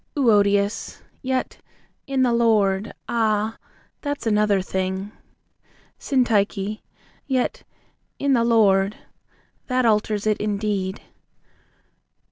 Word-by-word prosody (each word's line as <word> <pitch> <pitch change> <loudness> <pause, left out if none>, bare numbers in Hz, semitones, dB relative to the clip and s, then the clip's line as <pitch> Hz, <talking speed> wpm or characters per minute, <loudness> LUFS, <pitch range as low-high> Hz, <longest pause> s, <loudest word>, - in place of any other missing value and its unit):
EUODIAS. 205 -4 +2 0.2
Yet, 260 -1 -2 0.5
"in 270 -1 +1
the 245 -2 +2
Lord." 210 -3 +2 0.2
Ah, 220 -1 0 0.4
that's 285 -3 -4
another 210 -2 +3
thing! 190 +1 -3 0.9
SYNTYCHE. 215 -5 0 0.5
Yet, 260 -3 -1 0.6
"in 280 -1 +1
the 235 -2 +3
Lord." 205 -3 +3 0.7
That 255 -1 +1
alters 210 -1 +1
it 215 -1 +2
in 210 -1 -1
deed. 200 -2 -2
215 Hz, 95 wpm, -23 LUFS, 200-235 Hz, 0.9 s, another